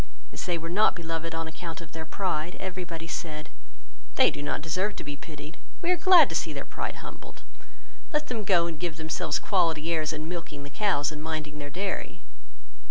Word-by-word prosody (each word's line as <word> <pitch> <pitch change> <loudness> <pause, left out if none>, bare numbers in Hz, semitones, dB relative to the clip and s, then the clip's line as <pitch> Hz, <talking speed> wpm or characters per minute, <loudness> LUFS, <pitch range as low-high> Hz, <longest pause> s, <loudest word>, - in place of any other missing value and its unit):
As - - -4
they 175 -1 +2
were 165 0 -5
not 200 +6 +4
beloved 165 -1 -3
on 165 0 -2
account 165 +2 -5
of 165 -3 -10
their 160 0 -5
pride, 175 -2 -1
every 185 -1 -3
body 165 -1 -6
said, 155 -3 -4 0.7
"they - - +7
do - - -5
not 145 - -1
deserve 185 +6 0
to - - -5
be 145 0 -4
pitied, 150 +1 -9 0.3
we 350 - +4
are - - +6
glad 360 +1 +8
to - - -4
see - - 0
their - - -4
pride - - -4
humbled, - - -10 0.7
let 300 0 +2
them 235 -6 -2
go 180 -4 +5
and 165 -3 -4
give 170 -2 -2
themselves 155 -2 0
quality 165 -4 +2
airs 155 -1 +1
in 155 0 -4
milking 165 -4 -5
the 145 - -8
cows 145 -6 +2
and 150 -1 -6
minding 155 -1 -3
their 145 0 -5
dairy. 190 +6 -3
165 Hz, 205 wpm, -29 LUFS, 155-180 Hz, 0.7 s, glad